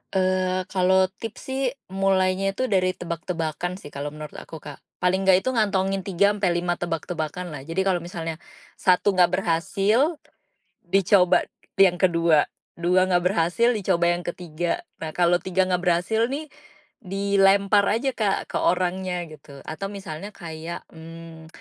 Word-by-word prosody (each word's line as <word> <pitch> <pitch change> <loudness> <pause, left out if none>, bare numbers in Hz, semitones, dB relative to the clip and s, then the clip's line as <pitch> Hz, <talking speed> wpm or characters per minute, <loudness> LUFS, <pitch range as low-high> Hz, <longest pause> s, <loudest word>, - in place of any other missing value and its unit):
Eee, 185 0 +1
kalau 190 0 +3
tips 225 -2 -7
sih 265 +1 -2 0.3
mulainya 195 0 +1
itu 255 - -1
dari 185 -1 +2
tebak-tebakan 170 0 -4
sih 165 -6 -11
kalau 140 +1 -5
menurut 150 0 -8
aku, - - -11
Kak, 145 -2 -9 0.2
paling 190 +1 +1
enggak 190 0 +5
itu 260 - 0
ngantongin 195 -4 +1
3 195 +1 +2
sampai 195 -4 0
5 175 0 -1
tebak-tebakan 170 0 -4
lah 145 - -6
jadi 165 +3 -1
kalau 190 -2 +1
misalnya, 165 -2 -6 0.4
1 185 +2 +3
enggak 180 -1 +3
berhasil, 195 - +1 0.7
dicoba 185 -1 +3 0.3
yang 190 -2 +6
kedua, 170 -4 +3 0.2
2 180 +2 +2
enggak 180 -1 +2
berhasil, 180 +7 +2
dicoba 185 -6 +1
yang 175 0 -2
ketiga. 175 -1 -3 0.2
Nah 160 -1 -6
kalau 175 0 +3
3 185 +1 0
enggak 180 -1 +1
berhasil 180 +7 +2
nih, 290 +4 -5 0.5
dilempar 200 0 +3
aja, 235 +6 +1
Kak, 215 -6 -1
ke - - -1
orangnya 180 0 0
gitu 140 -2 -13
atau 160 +5 -5
misalnya 195 -1 -7
kayak, 165 0 -7
mmm, 165 0 -11
185 Hz, 145 wpm, -24 LUFS, 170-195 Hz, 0.7 s, yang